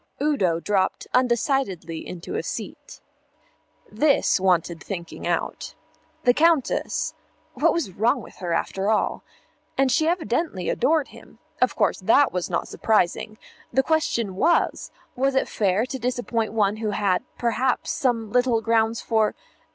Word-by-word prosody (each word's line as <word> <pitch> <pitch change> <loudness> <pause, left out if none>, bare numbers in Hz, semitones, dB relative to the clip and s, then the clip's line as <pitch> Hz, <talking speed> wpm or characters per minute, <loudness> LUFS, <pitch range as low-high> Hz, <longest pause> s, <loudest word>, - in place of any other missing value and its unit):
Udo 230 - +1
dropped 190 +1 0
undecidedly 235 - 0
into 175 -1 -7
a - - -1
seat. - - -7 0.9
This 275 -1 +3
wanted 175 -3 +1
thinking 170 -4 -6
out. - - -3 0.5
The 245 - +5
Countess 320 -2 +1 0.4
what - - +3
was 335 - -2
wrong 220 +6 +1
with - - -13
her, 175 -3 -4
after 190 +4 -1
all? 220 - +1 0.6
And 270 -1 +3
she 315 +3 +2
evidently 320 - -1
adored 310 -2 +1
him. - - -16 0.2
Of - - +2
course - - +1
that 230 +8 +4
was 180 -1 -2
not - - -1
surprising; 215 0 0 0.3
the 265 - +3
question 235 - 0
was, 335 - +1 0.3
was 270 +1 +1
it 265 - +2
fair 205 +1 +1
to 265 +1 -6
disappoint 240 -2 -1
one 210 -1 +1
who 215 -1 -2
had, 200 -3 +1
perhaps, 245 +2 0
some 230 -5 -1
little 245 -2 +3
grounds 225 0 +1
for 220 -2 +1
225 Hz, 140 wpm, -24 LUFS, 195-265 Hz, 0.9 s, The